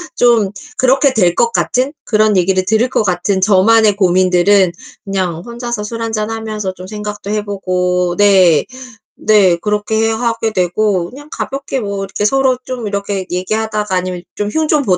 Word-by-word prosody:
좀 235 -5 +3 0.3
그렇게 265 +1 +3
될 180 -7 +3
것 235 0 +2
같은 260 +3 0
그런 215 -1 +2
얘기를 185 +1 +1
들을 220 +5 +1
것 220 - 0
같은 190 +1 0
저만의 210 +2 +4
고민들은 185 0 +3 0.3
그냥 185 -4 -2
혼자서 240 -2 -5
술 230 +2 -6
한잔 220 -1 -2
하면서 215 -4 -4
좀 185 - -11
생각도 210 -1 -6
해 210 -1 -2
보고. 180 -2 -1
네. 190 -6 +4 0.6
네. 195 -5 +4
그렇게 210 +1 0
해 - - 0
하게 225 -1 -1
되고 180 0 0
그냥 290 +4 -13
가볍게 275 0 -4
뭐 200 -3 -4
이렇게 205 +1 -3
서로 265 +2 +2
좀 245 -4 -5
이렇게 200 -1 -3
얘기하다가 210 +2 -2
아니면 180 -1 -2
좀 205 0 -2
흉 315 +3 0
좀 300 -1 +2
보다가. 240 - -6
210 Hz, 330 characters per minute, -15 LUFS, 185-225 Hz, 0.6 s, 저만의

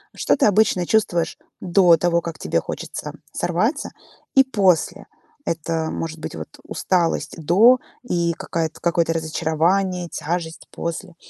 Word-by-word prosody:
Что - - +1
ты 280 - +3
обычно 205 -3 +3
чувствуешь 175 -7 +1 0.2
до 175 -1 +5
того, 170 +1 +1
как 165 -2 -6
тебе - - 0
хочется - - -6 0.2
сорваться - - -1 0.5
и 270 - +8
после? 195 -10 +1 0.4
Это 165 0 -2
может 165 -1 -5
быть, - - -6
вот, 80 -1 -7
усталость 165 -4 -1
до 215 +11 +5 0.2
и 170 -6 0
какая-то, 160 -1 -4
какое-то 170 -1 +1
разочарование, 165 +3 0
тяжесть 165 0 -4
после? 170 +1 -5
170 Hz, 130 wpm, -22 LUFS, 160-185 Hz, 0.5 s, и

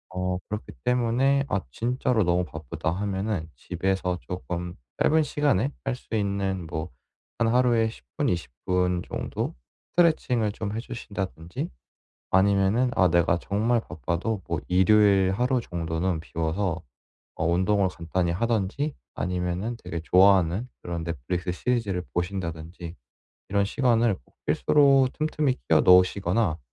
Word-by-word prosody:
어 90 0 -1
그렇기 105 +1 -5
때문에 125 +3 +2
'아 100 - 0
진짜로 120 - 0
너무 90 +1 +2
바쁘다.' 80 -2 -4
하면은 100 -1 -2
집에서 90 +2 -1
쪼끔 85 +8 -5 0.3
짧은 160 +1 +4
시간에 145 -2 +1 0.2
할 135 -2 0
수 125 - -13
있는 100 -3 -1
뭐 80 +1 -4 0.5
한 115 - +3
하루에 120 -1 +3
10 85 - -13
분, - - +1
20 85 -6 -2
분 90 -1 +1
정도 - - -3 0.4
스트레칭을 125 -10 +2
좀 105 -1 -4
해 - - -2
주신다든지 100 -8 -5 0.6
아니면은 100 +6 +3
아 90 - +5
내가 85 0 +3
정말 110 +6 +1
바빠도 90 +4 -3
뭐 85 - -1
일요일 95 +1 +4
하루 125 +5 +1
정도는 85 -2 -2
비워서 85 +2 -2 0.5
어 - - -1
운동을 95 +3 +2
간단히 85 0 -1
하든지 115 - -1 0.2
아니면은 90 +5 -2
되게 85 - -4
좋아하는 95 +3 +4 0.2
그런 85 -2 -4
넷플릭스 85 +3 -3
시리즈를 105 -3 -1
보신다든지 85 -2 -4 0.5
이런 100 0 +2
시간을 115 -1 +2
꼭 - - -30
필수로 140 -3 +4
틈틈이 150 -3 0
끼워 80 - +5
넣으시거나 90 0 +4
95 Hz, 295 characters per minute, -26 LUFS, 90-115 Hz, 0.6 s, 아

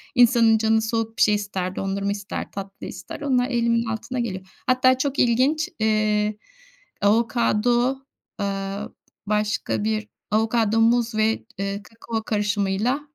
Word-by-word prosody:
insanın 235 -2 +5
canı 220 0 +2
soğuk 225 0 -2
bir - - -1
şey 210 -1 +5
ister, 190 -3 -3
dondurma 195 +1 -2
ister, 200 -1 -5
tatlı 195 0 -7
ister 180 +9 -8
onlar 255 -3 +1
elimin 235 -1 +1
altına 225 +3 -4
geliyor. 190 -5 -3 0.2
Hatta 255 0 +4
çok 280 +1 -1
ilginç, 260 +6 +2
eee, 215 -1 +1 0.6
avokado, 235 +3 +2 0.4
aaa, 200 +1 -3 0.4
başka 210 0 0
bir 215 0 -1 0.2
avokado 225 0 +2
muz 235 0 +3
ve, 220 +1 +1
eee, 200 +1 -2
kakao 225 0 -5
karışımıyla 205 +4 0
220 Hz, 130 wpm, -23 LUFS, 205-235 Hz, 0.6 s, insanın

